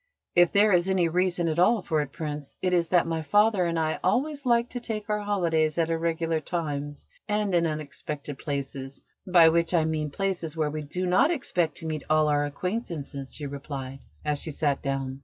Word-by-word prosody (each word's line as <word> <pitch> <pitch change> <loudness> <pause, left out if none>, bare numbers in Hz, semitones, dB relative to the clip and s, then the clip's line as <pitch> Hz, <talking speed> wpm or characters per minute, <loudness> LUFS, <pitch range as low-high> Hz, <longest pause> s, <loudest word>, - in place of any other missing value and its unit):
"If 175 -1 +5
there 205 +1 +4
is 180 0 +3
any 185 -3 +3
reason 175 0 +1
at 160 +1 0
all 205 +3 +4
for 155 -2 +1
it, 140 -2 -5
Prince, 150 -3 -6
it 180 -1 0
is 170 -1 +2
that 175 0 +3
my 165 -1 -2
father 205 +3 +3
and 170 -1 -1
I 160 -1 0
always 280 +8 0
like 235 0 +3
to 245 - -4
take 220 -3 -5
our 210 - +1
holidays 170 -7 +1
at 165 -1 +1
irregular 165 0 0
times 145 -3 -4 0.2
and 210 -2 0
in 170 -1 +3
unexpected 150 -2 -5
places: 140 -1 -5 0.2
by 175 -3 +7
which, 170 +2 +2
I 160 -2 +3
mean 155 -1 -1
places 175 -2 -2
where 155 -2 0
we 155 0 -4
do 180 +5 -3
not 180 - +4
expect 180 - -1
to - - -8
meet 155 -2 -3
all 155 0 +4
our 145 0 +2
acquaintances," 150 - -5
she 150 - -6
replied, 135 -1 -6 0.3
as 150 -1 0
she 160 - -3
sat 145 -2 0
down. 135 -1 -3
165 Hz, 200 wpm, -27 LUFS, 150-185 Hz, 0.3 s, by